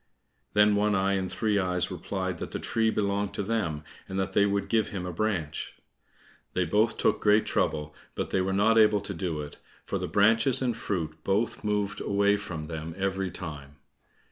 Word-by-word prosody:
Then 105 Hz, 0 st, +5 dB
One 105 Hz, 0 st, +2 dB
eye 95 Hz, +1 st, +2 dB
and 95 Hz, -1 st, -1 dB
Three 105 Hz, -2 st, +1 dB
eyes 90 Hz, 0 st, 0 dB
replied 95 Hz, +1 st, -3 dB
that -, -, -5 dB
the -, -, -4 dB
tree 110 Hz, 0 st, +1 dB
belonged 100 Hz, -1 st, -1 dB
to 100 Hz, -, -1 dB
them, 95 Hz, -9 st, -1 dB, 0.3 s
and 95 Hz, -, -4 dB
that 95 Hz, -, -2 dB
they 100 Hz, 0 st, +4 dB
would 100 Hz, 0 st, -1 dB
give 110 Hz, -2 st, +2 dB
him 95 Hz, -3 st, -4 dB
a 90 Hz, -, -4 dB
branch. 85 Hz, -6 st, -2 dB, 0.8 s
They 90 Hz, -, +2 dB
both 110 Hz, +4 st, +2 dB
took -, -, +1 dB
great 105 Hz, +1 st, +4 dB
trouble, 75 Hz, 0 st, -1 dB, 0.2 s
but -, -, -3 dB
they 95 Hz, -, +2 dB
were 95 Hz, +1 st, -1 dB
not 110 Hz, +4 st, +4 dB
able 105 Hz, -2 st, +5 dB
to 100 Hz, -, -5 dB
do 85 Hz, -3 st, -3 dB
it, 75 Hz, -1 st, -9 dB, 0.3 s
for -, -, -2 dB
the -, -, -3 dB
branches 110 Hz, +5 st, +4 dB
and 125 Hz, -3 st, 0 dB
fruit 80 Hz, -8 st, -4 dB
both 105 Hz, +5 st, 0 dB
moved 105 Hz, -1 st, -1 dB
away 100 Hz, 0 st, +2 dB
from 85 Hz, -6 st, -5 dB
them 80 Hz, 0 st, -6 dB
every 95 Hz, -1 st, -1 dB
time. 75 Hz, -6 st, -8 dB
100 Hz, 195 wpm, -28 LUFS, 90-105 Hz, 0.8 s, Then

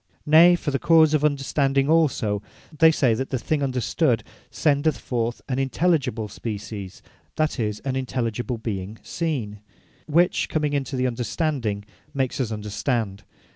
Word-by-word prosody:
Nay 165 Hz, +4 st, +7 dB
for 160 Hz, -4 st, -3 dB
the 135 Hz, -, -1 dB
cause 160 Hz, -2 st, +5 dB
of 150 Hz, -1 st, +2 dB
Understanding 135 Hz, -1 st, +1 dB
also, 135 Hz, -10 st, +2 dB, 0.3 s
they 160 Hz, +2 st, +6 dB
say 135 Hz, -7 st, +2 dB
the 115 Hz, -, -1 dB
thing 145 Hz, +5 st, -1 dB
Understood 130 Hz, -4 st, +1 dB, 0.3 s
sendeth 145 Hz, -1 st, +1 dB
forth 120 Hz, +1 st, -3 dB
Intelligible 135 Hz, -3 st, 0 dB
Species, 100 Hz, -3 st, -7 dB, 0.3 s
that 155 Hz, -3 st, 0 dB
is, 105 Hz, -2 st, -2 dB
an 135 Hz, -1 st, -3 dB
Intelligible 125 Hz, -2 st, -2 dB
Being 105 Hz, -2 st, -5 dB
Seen; 125 Hz, -12 st, -3 dB, 0.5 s
which 170 Hz, +3 st, +2 dB
comming 150 Hz, -2 st, 0 dB
into 140 Hz, -1 st, -2 dB
the 130 Hz, 0 st, 0 dB
Understanding, 120 Hz, -3 st, -2 dB, 0.3 s
makes 135 Hz, 0 st, -1 dB
us 115 Hz, -3 st, -2 dB
Understand. 105 Hz, -1 st, -2 dB
130 Hz, 135 wpm, -24 LUFS, 110-150 Hz, 0.5 s, Nay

